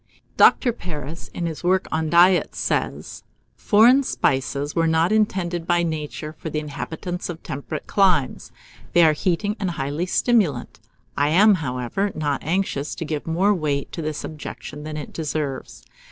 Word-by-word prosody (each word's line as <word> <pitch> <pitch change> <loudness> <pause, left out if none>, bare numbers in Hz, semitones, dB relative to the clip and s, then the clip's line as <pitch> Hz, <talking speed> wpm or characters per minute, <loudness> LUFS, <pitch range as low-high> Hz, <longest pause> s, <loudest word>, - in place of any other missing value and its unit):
Dr. 245 -3 +5
Paris, 160 - -7
in 175 - -5
his 165 0 -5
work 185 +2 +2
on 160 0 -1
Diet, 175 +2 +4
says, - - -2 0.3
"Foreign 235 +6 +5
spices 140 - -1
were 165 -1 +2
not 160 +3 +2
intended 185 -6 0
by 175 0 +2
Nature 155 -1 -4
for 160 +1 -7
the 155 - -4
inhabitants 160 +4 -5
of 165 -2 -7
temperate 140 +1 -6
climes; 180 -10 +1 0.4
they 175 - +6
are 155 -1 +5
heating, 190 +6 -1
and 195 -3 -1
highly 150 +2 -3
stimulant. 155 - +1 0.4
I 145 +1 +2
am, 205 +7 +6
however, 150 - -2
not 145 -2 -2
anxious 160 -3 -1
to 165 - -5
give 155 0 -4
more 185 +6 +2
weight 150 -6 -2
to 165 - -5
this 155 -1 -4
objection 150 -1 -8
than 155 0 -5
it 150 - -7
deserves. 150 -4 -4
160 Hz, 155 wpm, -22 LUFS, 150-185 Hz, 0.4 s, they